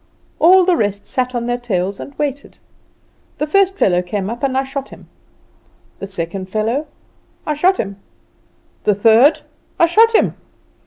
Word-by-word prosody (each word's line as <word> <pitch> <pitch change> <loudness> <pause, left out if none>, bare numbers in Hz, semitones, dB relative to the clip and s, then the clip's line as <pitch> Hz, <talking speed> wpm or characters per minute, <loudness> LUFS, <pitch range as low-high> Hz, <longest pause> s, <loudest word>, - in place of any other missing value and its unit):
All 365 +2 +6
the 365 -1 +3
rest 205 -6 -2
sat 255 -1 -2
on 235 -1 -2
their 245 0 -2
tails 195 -5 -2
and 280 - -10
waited. 285 -1 -4 0.8
The 300 - -1
first 390 +4 +2
fellow 180 - +2
came 195 +3 -4
up, 235 - -7
and 265 -1 0
I 265 - +1
shot 275 0 -6
him; - - -14 0.9
the 195 - -6
second 185 0 -4
fellow 225 +9 -2 0.6
I 305 - -1
shot 365 +6 +2
him; 195 0 -4 0.9
the 210 - +2
third 225 +8 +4 0.4
I 340 - +6
shot 450 +7 +4
him. - - +3
250 Hz, 160 wpm, -17 LUFS, 200-300 Hz, 0.9 s, All